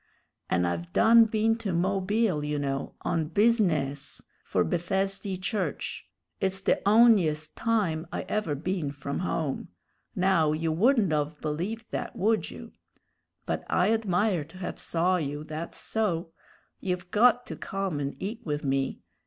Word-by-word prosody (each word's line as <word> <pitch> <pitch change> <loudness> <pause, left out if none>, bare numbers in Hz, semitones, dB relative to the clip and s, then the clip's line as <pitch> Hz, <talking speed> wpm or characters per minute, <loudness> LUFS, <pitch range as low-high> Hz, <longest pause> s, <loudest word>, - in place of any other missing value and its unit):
"And 90 - +2
I've 85 0 -3
done 230 0 +7
been 225 +1 +1
to 210 -4 -2
Mobile, 190 0 +1
you 150 0 -1
know, 135 -1 -3
on 160 -2 -1
busi_ness_ 160 - +1 0.2
for 90 - +1
Bethesdy 190 - -1
Church. 185 - -3 0.3
It's 190 0 -1
the 195 - +1
on'yest 200 -9 +4
time 190 -8 0
I - - -3
ever 210 -9 -1
been 160 0 -2
from 140 0 -4
home; 160 -5 -2 0.5
now 180 -5 +3
you 160 +1 -1
wouldn't 205 - +3
of 150 0 -1
believed 185 +10 -4
that, - - -4
would 215 +3 +1
you? - - -10 0.7
But - - -2
I 195 +5 +3
admire 200 -5 +1
to 165 +4 -15
have 185 - -5
saw 180 +2 +1
you, 145 -2 -3
that's 155 +2 -6
so. 180 -7 -1 0.5
You've 180 -1 -3
got 245 +3 +4
to - - -6
come 195 -6 -3
and 140 0 -3
eat 215 +4 -5
with 150 -2 -3
me. 135 0 0
180 Hz, 145 wpm, -28 LUFS, 150-210 Hz, 0.7 s, done